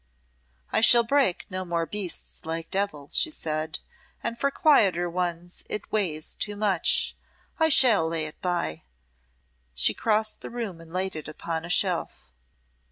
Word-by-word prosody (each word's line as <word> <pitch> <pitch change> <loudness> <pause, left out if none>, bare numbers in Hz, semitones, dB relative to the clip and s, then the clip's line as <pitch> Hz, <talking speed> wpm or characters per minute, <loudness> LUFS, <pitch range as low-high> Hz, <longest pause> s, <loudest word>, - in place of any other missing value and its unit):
"I - - +2
shall 235 +1 +7
break 260 -6 +2
no 185 0 -3
more 170 -2 -1
beasts 195 -1 -2
like 165 0 -4
Devil," 190 -8 -2
she - - +2
said, 155 - -3 0.5
"and 230 - -2
for 280 - +2
quieter 210 - +3
ones 175 0 -4
it 210 - -5
weighs 165 -8 -1
too 210 -1 -3
much; 200 -5 +2 0.4
I 320 0 +4
shall 230 - +5
lay 165 -1 0
it 155 - -7
by." 175 - -1 0.9
She 105 - +3
crossed 215 - 0
the - - -7
room 225 -8 -5
and 165 0 -15
laid 185 +1 -1
it 155 -2 -6
upon 160 +1 -5
a - - -8
shelf. 70 - 0
180 Hz, 155 wpm, -26 LUFS, 165-215 Hz, 0.9 s, shall